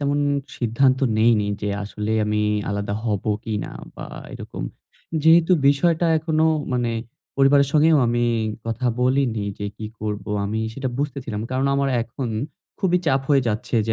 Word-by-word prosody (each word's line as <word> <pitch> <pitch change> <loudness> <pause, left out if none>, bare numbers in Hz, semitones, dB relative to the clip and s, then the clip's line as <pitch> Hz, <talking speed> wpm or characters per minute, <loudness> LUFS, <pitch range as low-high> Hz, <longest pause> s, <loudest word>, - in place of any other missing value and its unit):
তেমন 145 0 +1 0.4
সিদ্ধান্ত 130 +3 +2 0.2
নেইনি 110 -2 +4 0.2
যে 105 - -1
আসলে 105 +1 -3
আমি 105 0 0 0.3
আলাদা 100 0 -2
হব 105 -4 -1 0.2
কিনা 110 -3 -3 0.2
বা - - -7 0.3
এরকম। - - -7 0.6
যেহেতু 165 +3 +6 0.2
বিষয়টা 165 +4 +3
এখনো 160 0 +1 0.3
মানে 120 -2 0 0.5
পরিবারের 140 0 +5
সঙ্গেও 155 0 +5
আমি 120 0 +1 0.4
কথা 115 +2 -2
বলিনি 125 -4 +1
যে 105 - -3
কি 110 - -6
করব 105 -1 -3 0.2
আমি 110 +2 -2
সেটা 135 -1 -3
বুঝতেছিলাম। 130 -7 -3
কারণ 130 +1 0
আমার 140 0 +1
এখন 125 +2 -5 0.5
খুবই 180 -2 +3
চাপ 135 -1 +3
হয়ে 140 -2 +4
যাচ্ছে 115 +3 -1
যে 110 - +1
125 Hz, 145 wpm, -22 LUFS, 110-140 Hz, 0.6 s, যেহেতু